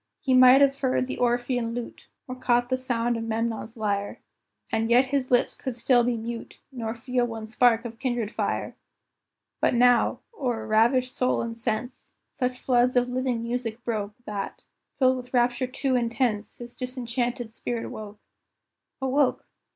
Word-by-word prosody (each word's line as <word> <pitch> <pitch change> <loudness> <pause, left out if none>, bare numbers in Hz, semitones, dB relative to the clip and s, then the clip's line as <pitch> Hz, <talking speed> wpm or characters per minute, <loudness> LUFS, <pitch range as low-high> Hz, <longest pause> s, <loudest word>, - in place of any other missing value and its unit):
He 265 -4 0
might 255 +1 +8
have 275 0 +4
heard 255 -1 +1
the 255 - -5
Orphean 245 -1 0
lute, 245 -1 -7 0.2
Or 255 - -5
caught 245 -1 +1
the 255 - +2
sound 240 -2 -1
of 225 - -4
Memnon's 225 0 -3
lyre, 205 -2 -2 0.5
And 225 0 0
yet 245 +3 +5
his 270 -2 +1
lips 245 -1 +2
could 260 -3 -5
still 245 0 +3
be 240 0 0
mute, 230 +1 -6
Nor 230 -3 -4
feel 250 +1 0
one 225 -2 -6
spark 235 0 +3
of 230 -1 -7
kindred 240 -5 -1
fire. - - -2 0.8
But - - +2
now, 245 0 +4
o'er 245 - -2
ravished 240 +4 +3
soul 255 -1 +1
and 230 0 -5
sense, 230 +2 -4 0.2
Such 250 -2 -2
floods 250 0 +2
of 245 0 +2
living 250 -2 -1
music 235 -1 -3
broke, 215 -4 -3
That, 205 -2 -5 0.3
filled 260 -1 +4
with 250 0 -7
rapture 245 +1 +2
too 260 +1 -1
intense, 235 -3 -1
His 240 0 -9
disenchanted 245 -2 -3
spirit 235 0 -4
woke. 210 -1 -8 0.9
Awoke! 265 +1 +1
240 Hz, 160 wpm, -26 LUFS, 230-255 Hz, 0.9 s, might